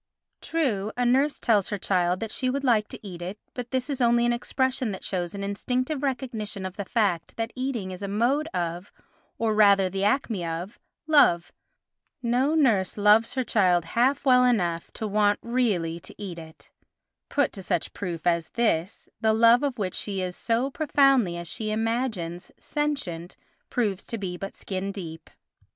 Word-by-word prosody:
True, 220 Hz, -11 st, -1 dB
a 245 Hz, -, +1 dB
nurse 270 Hz, +4 st, +3 dB
tells 210 Hz, -4 st, +2 dB
her 205 Hz, -, -2 dB
child 180 Hz, -1 st, +1 dB
that 225 Hz, -1 st, -3 dB
she 255 Hz, -, -1 dB
would 275 Hz, +2 st, -2 dB
like 225 Hz, -5 st, +3 dB
to 210 Hz, -, -9 dB
eat 175 Hz, -2 st, -8 dB
it, 185 Hz, +4 st, -5 dB, 0.2 s
but 245 Hz, -1 st, -6 dB
this 260 Hz, 0 st, -1 dB
is 275 Hz, -3 st, -3 dB
only 235 Hz, 0 st, +4 dB
an 240 Hz, -, +2 dB
expression 255 Hz, 0 st, -1 dB
that 190 Hz, -, -6 dB
shows 175 Hz, -1 st, -3 dB
an 200 Hz, -, -4 dB
instinctive 255 Hz, +8 st, -2 dB
recognition 240 Hz, -8 st, -3 dB
of 185 Hz, 0 st, -5 dB
the 200 Hz, -, -4 dB
fact 195 Hz, -6 st, 0 dB
that 225 Hz, +1 st, -3 dB
eating 255 Hz, -7 st, -3 dB
is 185 Hz, +1 st, -8 dB
a 200 Hz, -, -3 dB
mode 245 Hz, +10 st, +1 dB
of, 175 Hz, -, -4 dB, 0.5 s
or 225 Hz, -1 st, +1 dB
rather 200 Hz, -3 st, +5 dB
the 195 Hz, +1 st, -2 dB
acme 210 Hz, -3 st, +1 dB
of, 170 Hz, +5 st, -5 dB, 0.3 s
love—no 255 Hz, -, 0 dB
nurse 225 Hz, -13 st, +2 dB
loves 210 Hz, +4 st, +4 dB
her 260 Hz, -, +1 dB
child 180 Hz, -7 st, +2 dB
half 265 Hz, +4 st, +2 dB
well 250 Hz, -1 st, +6 dB
enough 175 Hz, -9 st, +1 dB
to 220 Hz, -, -4 dB
want 205 Hz, 0 st, +2 dB
really 205 Hz, -9 st, 0 dB
to -, -, -12 dB
eat 185 Hz, -5 st, -6 dB
it; 160 Hz, -1 st, -13 dB, 0.6 s
put 285 Hz, -2 st, +1 dB
to 195 Hz, -, -7 dB
such 175 Hz, -2 st, -2 dB
proof 175 Hz, -4 st, -5 dB
as 170 Hz, -2 st, +1 dB
this 205 Hz, -5 st, 0 dB
the 220 Hz, 0 st, +3 dB
love 230 Hz, +2 st, +6 dB
of 280 Hz, -4 st, -1 dB
which 190 Hz, -4 st, -2 dB
she 200 Hz, -2 st, -3 dB
is 180 Hz, -1 st, -3 dB
so 240 Hz, +4 st, 0 dB
profoundly, 270 Hz, -, +3 dB
as 170 Hz, 0 st, -6 dB
she 215 Hz, +6 st, -3 dB
imagines, 215 Hz, -6 st, -2 dB
sentient 275 Hz, -, -3 dB, 0.3 s
proves 210 Hz, -6 st, -1 dB
to 230 Hz, -, -5 dB
be 190 Hz, -4 st, -4 dB
but 195 Hz, +2 st, -7 dB
skin 195 Hz, 0 st, -4 dB
deep. 165 Hz, -5 st, -8 dB
215 Hz, 175 wpm, -26 LUFS, 185-250 Hz, 0.6 s, well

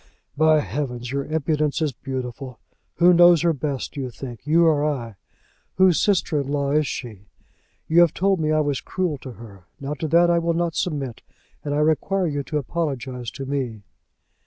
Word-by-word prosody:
"By 155 Hz, 0 st, +4 dB
heavens, 125 Hz, +2 st, -4 dB
your 140 Hz, 0 st, -2 dB
impudence 155 Hz, -1 st, 0 dB
is 155 Hz, -3 st, 0 dB
beautiful. 130 Hz, 0 st, -6 dB, 0.4 s
Who 175 Hz, +1 st, +5 dB
knows 175 Hz, -1 st, +6 dB
her 170 Hz, -1 st, +3 dB
best, 140 Hz, -2 st, -4 dB
do 140 Hz, -, -5 dB
you 130 Hz, -, -4 dB
think, 125 Hz, +2 st, -9 dB
you 165 Hz, +2 st, +4 dB
or 150 Hz, -3 st, +3 dB
I? 130 Hz, -7 st, -2 dB, 0.6 s
Whose 185 Hz, -3 st, +4 dB
sister 175 Hz, -7 st, +1 dB
in 135 Hz, -, -6 dB
law 140 Hz, -1 st, -1 dB
is 150 Hz, 0 st, +2 dB
she? 105 Hz, -6 st, -7 dB, 0.6 s
You 165 Hz, +2 st, +5 dB
have 170 Hz, -3 st, +5 dB
told 195 Hz, 0 st, +1 dB
me 155 Hz, -1 st, 0 dB
I 155 Hz, 0 st, +3 dB
was 145 Hz, -3 st, -1 dB
cruel 175 Hz, -7 st, -2 dB
to 130 Hz, -1 st, -9 dB
her. 100 Hz, -6 st, -13 dB
Now 140 Hz, +1 st, -4 dB
to 155 Hz, +2 st, -4 dB
that 170 Hz, +2 st, +4 dB
I 170 Hz, -, +3 dB
will 170 Hz, 0 st, 0 dB
not 170 Hz, -1 st, 0 dB
submit, 140 Hz, -10 st, -3 dB, 0.4 s
and 145 Hz, -1 st, -2 dB
I 150 Hz, -, +1 dB
require 180 Hz, +5 st, +1 dB
you 145 Hz, -3 st, -1 dB
to 150 Hz, -, -2 dB
apologize 130 Hz, -5 st, -3 dB
to 135 Hz, -, -7 dB
me." 130 Hz, -6 st, -3 dB
150 Hz, 190 wpm, -23 LUFS, 130-165 Hz, 0.6 s, knows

